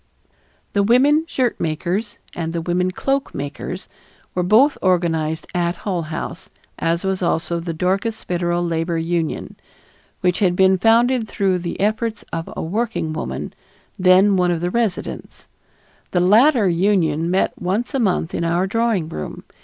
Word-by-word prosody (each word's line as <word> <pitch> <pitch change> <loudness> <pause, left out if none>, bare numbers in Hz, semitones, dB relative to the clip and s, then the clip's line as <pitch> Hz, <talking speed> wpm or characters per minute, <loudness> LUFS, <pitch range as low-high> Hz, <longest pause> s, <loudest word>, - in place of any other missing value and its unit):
The 200 - +3
women 275 +9 +4
shirt 255 -7 -1
makers 180 +7 -2 0.2
and 165 -1 -4
the 170 - -2
women 180 +2 0
cloak 270 +8 -2
makers 145 +6 -5 0.5
were 180 - 0
both 225 +11 +4
organized 165 -4 +1
at 175 -1 0
Hull 180 -1 -3
House 155 0 -6 0.3
as 170 +2 0
was 190 -1 -1
also 170 0 0
the 170 0 -4
Dorcas 195 +7 -1
Federal 175 0 -1
Labor 165 0 -1
Union, 165 -1 -2 0.6
which 180 -1 +1
had 185 -4 +2
been 190 0 +4
founded 230 +2 +3
through 190 -3 0
the 170 -1 -5
efforts 215 +2 -1
of 165 0 -4
a - - -2
working 195 -3 -2
woman, 155 - -5 0.5
then 190 +2 +5
one 180 -1 +2
of 170 -2 0
the 175 +1 -1
residents. 230 -4 -3 0.6
The 180 - +1
latter 220 +5 +5
union 170 -3 +1
met 185 +2 +1
once 200 +7 -1
a 270 - 0
month 185 -7 0
in - - -1
our 170 +2 +1
drawing 220 -4 0
room. 75 - -6
180 Hz, 155 wpm, -20 LUFS, 170-215 Hz, 0.6 s, then